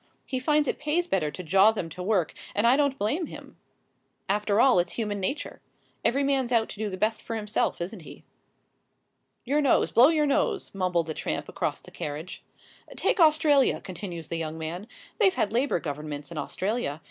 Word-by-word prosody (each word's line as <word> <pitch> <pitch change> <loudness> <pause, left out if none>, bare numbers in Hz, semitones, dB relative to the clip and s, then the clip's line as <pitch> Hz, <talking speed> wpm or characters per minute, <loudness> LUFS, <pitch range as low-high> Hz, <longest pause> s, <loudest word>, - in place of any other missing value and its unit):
He 260 - -3
finds 295 +2 +2
it - - -2
pays 305 +4 0
better 180 - 0
to 150 +5 -8
jaw 195 +5 +5
than 210 -6 -4
to 180 - -7
work, 185 -3 +1 0.2
and 205 +3 +2
I 240 +2 +6
don't 280 -1 +1
blame 295 - -1
him. - - -11 0.7
After 205 +1 +1
all, 255 -7 +6
it's 175 0 -1
human 210 -3 -2
nature. 195 +10 -4 0.4
Every 275 +4 +2
man's 270 -3 +1
out 230 -2 +2
to - - -9
do 215 -1 -1
the 185 - -5
best 215 +3 0
for 230 - -5
himself, 210 -1 -1
isn't 180 +3 -5
he?" - - -12 1.2
"Your 290 +4 +2
nose 275 - +3
blow 245 +3 +7
your 310 -1 +2
nose," 395 - 0
mumbled 180 -3 0
the 160 - -4
tramp - - -3
across - - -3
the - - -15
carriage. 150 +4 -6 0.5
"Take - - +1
Australia," 305 -4 +4
continues 175 -4 -7
the 165 - -3
young 160 -1 -4
man; 170 +6 -5 0.3
"they've 385 -4 +4
had 210 - 0
Labour 250 -5 +1
Governments 150 0 -6
in 170 - -7
Australia. 185 0 -2
210 Hz, 190 wpm, -27 LUFS, 175-275 Hz, 1.2 s, blow